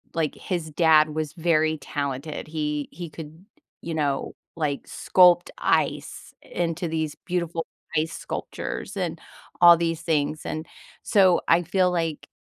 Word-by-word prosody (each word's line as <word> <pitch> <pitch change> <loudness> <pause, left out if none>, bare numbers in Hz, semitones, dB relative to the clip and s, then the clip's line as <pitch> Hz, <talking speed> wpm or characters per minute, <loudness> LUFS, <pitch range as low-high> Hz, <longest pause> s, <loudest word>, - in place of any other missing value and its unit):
like, 160 -3 0
his 170 -4 -4
dad 155 -1 +5
was 155 -1 -2
very 160 -2 +1
talented, 140 +1 -4
he 150 -2 -3
he 175 -2 -7
could, 160 +3 -11 0.4
you 165 - -5
know, 145 -3 -1 0.2
like, 150 -4 -2
sculpt 180 -1 +4
ice - - -1
into 170 0 -3
these 160 -2 -2
beautiful 170 -2 -2 0.3
ice 160 +1 0
sculptures - - -5
and - - -2 0.4
all 175 -1 +9
these 165 -1 -1
things, 155 -1 0
and 155 +1 -4 0.4
so 190 -4 +4
I 165 +1 +5
feel 180 +2 +2
like, 165 -3 -2
160 Hz, 135 wpm, -25 LUFS, 155-170 Hz, 0.4 s, all